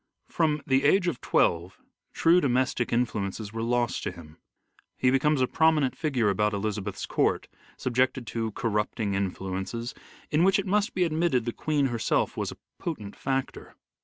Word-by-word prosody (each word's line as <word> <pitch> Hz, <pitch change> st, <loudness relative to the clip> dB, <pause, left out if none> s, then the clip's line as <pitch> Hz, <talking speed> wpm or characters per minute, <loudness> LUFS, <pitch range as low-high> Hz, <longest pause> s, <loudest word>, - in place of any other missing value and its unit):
From 150 Hz, -3 st, +1 dB
the 135 Hz, 0 st, +2 dB
age 180 Hz, +5 st, +4 dB
of 145 Hz, -9 st, -2 dB
twelve 85 Hz, +2 st, +1 dB, 0.3 s
true 170 Hz, +2 st, +4 dB
domestic 130 Hz, -3 st, +1 dB
influences 110 Hz, -3 st, -1 dB
were 115 Hz, -, -3 dB
lost 120 Hz, +1 st, 0 dB
to -, -, -3 dB
him; 80 Hz, -3 st, -13 dB, 0.6 s
he 125 Hz, -, +3 dB
becomes 135 Hz, +1 st, +2 dB
a 130 Hz, -, +3 dB
prominent 155 Hz, -4 st, +2 dB
figure 125 Hz, -9 st, +1 dB
about 105 Hz, +2 st, +1 dB
Elizabeth's 100 Hz, -1 st, -3 dB
court, -, -, 0 dB, 0.3 s
subjected 130 Hz, 0 st, 0 dB
to 115 Hz, -1 st, -3 dB
corrupting 105 Hz, -2 st, -1 dB
influences, 95 Hz, +4 st, -3 dB, 0.4 s
in 155 Hz, +3 st, +3 dB
which 190 Hz, +1 st, +5 dB
it 200 Hz, -, -1 dB
must 205 Hz, +3 st, +1 dB
be 185 Hz, -, +3 dB
admitted 160 Hz, -7 st, +1 dB
the 120 Hz, -, -2 dB
Queen 150 Hz, -3 st, 0 dB
herself 120 Hz, -3 st, 0 dB
was -, -, -2 dB
a -, -, -11 dB, 0.2 s
potent 105 Hz, -12 st, -5 dB
factor. 135 Hz, -1 st, -3 dB
125 Hz, 160 wpm, -27 LUFS, 105-150 Hz, 0.6 s, which